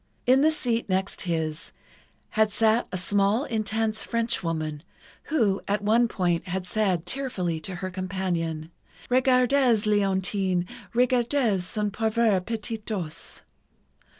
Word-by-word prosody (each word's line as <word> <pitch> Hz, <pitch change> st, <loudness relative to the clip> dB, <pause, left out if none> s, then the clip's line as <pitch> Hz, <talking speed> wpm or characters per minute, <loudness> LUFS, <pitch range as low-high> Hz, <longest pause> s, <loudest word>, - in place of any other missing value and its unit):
In 260 Hz, +2 st, +5 dB
the 310 Hz, -, +5 dB
seat 240 Hz, -8 st, -1 dB
next 190 Hz, +1 st, -1 dB
his, 160 Hz, -2 st, -2 dB, 0.6 s
had 215 Hz, 0 st, +2 dB
sat 225 Hz, +2 st, +2 dB
a 185 Hz, -, -2 dB
small, 200 Hz, +6 st, +2 dB
intense 220 Hz, -2 st, -1 dB
Frenchwoman, 165 Hz, -10 st, -2 dB, 0.4 s
who, 215 Hz, -11 st, +1 dB
at 205 Hz, 0 st, 0 dB
one 230 Hz, +3 st, +4 dB
point, 175 Hz, -5 st, -1 dB
had 180 Hz, 0 st, -3 dB
said, 185 Hz, -4 st, 0 dB
tearfully, 180 Hz, -9 st, -2 dB
to 185 Hz, +4 st, -6 dB
her 185 Hz, +1 st, -4 dB
companion: 180 Hz, -4 st, -3 dB, 0.4 s
"Regardez, 255 Hz, -2 st, +4 dB
Léontine, 190 Hz, -3 st, +1 dB, 0.3 s
regardez 245 Hz, -4 st, +2 dB
son 210 Hz, +2 st, -1 dB
pauvre 220 Hz, -2 st, +2 dB
petit 225 Hz, +1 st, -4 dB
dos!" 200 Hz, -8 st, -5 dB
205 Hz, 120 wpm, -26 LUFS, 180-230 Hz, 0.6 s, In